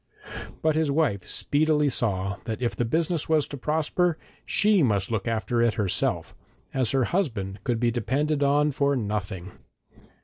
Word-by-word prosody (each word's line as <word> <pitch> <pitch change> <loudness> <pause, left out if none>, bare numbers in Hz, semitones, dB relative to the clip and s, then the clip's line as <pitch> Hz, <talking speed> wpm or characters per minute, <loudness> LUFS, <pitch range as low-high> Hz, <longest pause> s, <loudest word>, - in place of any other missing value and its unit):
But 155 0 +3
his 160 -2 +1
wife 140 - 0
speedily 150 0 +2
saw 100 -6 -1
that 110 -1 -3
if 120 -2 -1
the 120 - 0
business 160 +5 0
was 155 -2 +3
to - - -6
prosper 160 +4 0 0.3
she 210 -3 +3
must 105 -6 +1
look 110 -1 -2
after 115 +1 0
it 115 -2 +2
herself, 100 -4 -1 0.4
as 130 -4 +1
her 135 +1 +3
husband 110 - -2
could 120 -2 0
be 120 0 +2
depended 140 +6 0
on 145 +1 +3
for 140 +1 +1
nothing. 100 -5 -3
130 Hz, 160 wpm, -26 LUFS, 110-150 Hz, 0.4 s, But